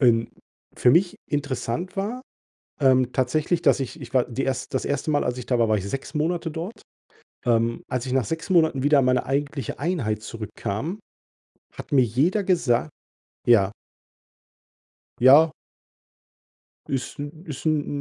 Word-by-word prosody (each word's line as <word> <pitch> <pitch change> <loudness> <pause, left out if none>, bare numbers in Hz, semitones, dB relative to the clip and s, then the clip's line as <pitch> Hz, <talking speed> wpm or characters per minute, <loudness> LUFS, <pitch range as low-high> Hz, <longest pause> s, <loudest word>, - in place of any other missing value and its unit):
denn 115 -3 +4 0.5
für 125 - +4
mich 175 +6 +3
interessant 145 +4 -3
war 220 +6 -3 0.9
tatsächlich, 150 +7 +1
ähm, - - -24
dass - - +4
ich 135 +4 -5
ich 125 -3 -10
war 130 -2 +3
die 130 +3 -3
erst 135 -1 -3
das 130 - -1
1. 145 +2 -1
Mal, 145 - +2
als 125 0 -2
ich 125 - -6
da 125 -2 +1
war, 115 - +3
war 110 - +3
ich 100 0 -4
6 135 +1 -5
Monate 165 +2 -1
dort. 180 +8 -6 0.6
Ähm, 115 0 +1
als 125 0 -2
ich 125 - -3
nach 130 -2 +2
6 160 - -5
Monaten 160 -7 +3
wieder 145 +1 +4
in - - +1
meine 125 -1 +2
eigentliche 140 0 -2
Einheit 130 - -1
zurückkam, 110 - -5 0.8
hat - - -9
mir 135 -3 +5
jeder 145 - +1
gesagt 155 -9 +1 0.6
Ja. 100 -5 +5 1.5
Ja. 145 +6 +7 1.4
Ist 135 +2 -3
'n 150 +4 -8
ist 150 -5 -7
'n 145 -2 0
135 Hz, 155 wpm, -24 LUFS, 125-160 Hz, 1.5 s, Ja